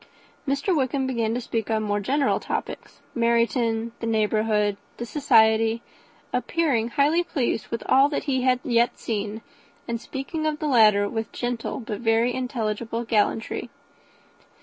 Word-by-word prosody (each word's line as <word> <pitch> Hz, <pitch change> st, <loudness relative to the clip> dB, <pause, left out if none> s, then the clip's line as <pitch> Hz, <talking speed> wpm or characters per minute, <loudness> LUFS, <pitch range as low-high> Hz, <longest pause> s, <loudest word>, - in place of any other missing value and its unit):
Mr. 280 Hz, +7 st, +1 dB
Wickham 270 Hz, -1 st, 0 dB
began 230 Hz, -3 st, -1 dB
to -, -, -1 dB
speak 225 Hz, -3 st, -3 dB
on 220 Hz, -1 st, +1 dB
more 205 Hz, -1 st, 0 dB
general 275 Hz, +7 st, +1 dB
topics, -, -, -5 dB
Meryton, 235 Hz, -1 st, +1 dB
the 230 Hz, -, -3 dB
neighbourhood, 215 Hz, -2 st, +1 dB, 0.2 s
the 240 Hz, -, -4 dB
society, 225 Hz, -4 st, +3 dB, 0.5 s
appearing 280 Hz, -10 st, +1 dB
highly 290 Hz, +7 st, +2 dB
pleased 255 Hz, -, -2 dB
with 230 Hz, -, -4 dB
all 275 Hz, +2 st, +5 dB
that 290 Hz, -, -2 dB
he 265 Hz, -3 st, 0 dB
had 255 Hz, 0 st, +2 dB
yet 240 Hz, -4 st, +2 dB
seen, 215 Hz, 0 st, -4 dB, 0.4 s
and 235 Hz, -1 st, -3 dB
speaking 290 Hz, +6 st, -4 dB
of 305 Hz, -1 st, -1 dB
the 305 Hz, -, -4 dB
latter, 215 Hz, -7 st, +5 dB
especially, 205 Hz, -, -3 dB
with 225 Hz, -1 st, -3 dB
gentle 240 Hz, 0 st, -3 dB
but 215 Hz, -3 st, -5 dB
very 230 Hz, +1 st, +2 dB
intelligible 230 Hz, -2 st, -3 dB
gallantry. 225 Hz, 0 st, 0 dB
235 Hz, 150 wpm, -24 LUFS, 220-260 Hz, 0.5 s, all